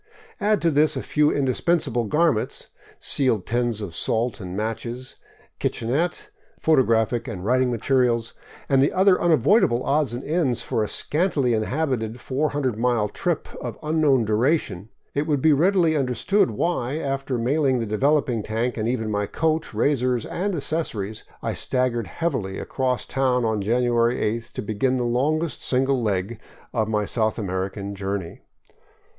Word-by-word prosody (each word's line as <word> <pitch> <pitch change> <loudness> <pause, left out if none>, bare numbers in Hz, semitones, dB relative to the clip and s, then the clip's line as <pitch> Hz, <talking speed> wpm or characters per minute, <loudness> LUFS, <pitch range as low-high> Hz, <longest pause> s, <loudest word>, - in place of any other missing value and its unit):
Add 210 -2 +1
to 165 - +3
this 150 +1 +3
a - - -3
few 150 0 +2
indispensable 135 -2 0
garments, 150 -1 0 0.3
sealed 125 -8 +1
tins 120 -2 -1
of 95 -5 -6
salt 115 +6 0
and 90 0 -6
matches, 115 +4 -4 0.4
kitchenette, 165 - -1 0.3
photographic 120 -5 +2
and 95 -6 -6
writing 130 +2 +2
materials, 120 -1 +1 0.3
and 135 -1 +3
the 140 - +3
other 190 0 +4
unavoidable 155 - +3
odds 140 -4 +1
and 125 - -6
ends 145 -7 0
for 110 - -1
a - - -2
scantily 150 - 0
inhabited 120 -1 -1
400 135 -3 -1
mile 120 -3 +1
trip - - -2
of - - -5
unknown 150 -6 +2
duration, 110 - +1
and 100 +5 -14 0.2
it 145 +2 -1
will 150 -2 +2
be 155 +3 +4
readily 170 +1 +3
understood 135 - +1
why, 130 +3 -1
after 135 -3 -2
mailing 130 +2 +1
the 115 - -1
developing 130 +2 +1
tank 115 +4 -2
and 110 0 -1
even 110 -3 -1
my 105 -1 -1
coat, 160 +4 -1
razor 130 -3 +1 0.2
and 195 +2 -1
accessories, 120 -10 -3 0.2
I - - -1
stag 130 -1 0
gered 115 -4 -3
heavily 120 - -2
across 130 -2 -2
town 130 -3 +1
on 110 -2 0
January 120 +2 +2
8th, 115 +1 -2
to 130 - -4
begin 110 +5 0
the 125 - 0
longest 145 +5 0
single 130 0 +1
leg 105 0 -1 0.3
of 110 -3 0
my 105 -1 0
South 110 0 0
American 100 0 -3
journey. 95 -3 -4
125 Hz, 150 wpm, -23 LUFS, 110-150 Hz, 0.4 s, other